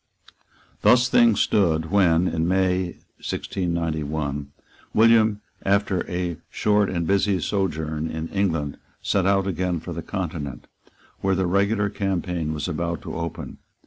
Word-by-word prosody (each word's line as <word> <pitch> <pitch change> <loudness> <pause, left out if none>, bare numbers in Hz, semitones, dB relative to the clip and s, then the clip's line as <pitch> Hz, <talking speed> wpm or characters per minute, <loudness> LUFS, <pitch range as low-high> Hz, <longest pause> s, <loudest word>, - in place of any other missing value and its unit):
Thus 125 0 +5
things 115 -4 +5
stood, 80 -5 +2
when, 90 -3 +4
in 80 0 0
May 95 0 +2 0.3
1691, 80 -5 -2 0.5
William, 110 -1 +5 0.2
after 100 -1 +1
a 90 -2 -2
short 105 -1 +2
and 85 -2 -1
busy 100 +1 +2
sojourn 80 -4 -2
in 80 0 -4
England, 80 -8 -1 0.3
set 95 -2 +1
out 100 -1 +3
again 90 -2 -1
for 85 +2 -7
the 85 - -4
Continent, 80 -8 -5 0.5
where 95 0 +1
the 95 0 +1
regular 100 +3 +1
campaign 90 -5 -2
was 75 +1 -3
about 85 -1 -3
to - - -6
open. 85 -1 -5
90 Hz, 130 wpm, -24 LUFS, 80-100 Hz, 0.5 s, Thus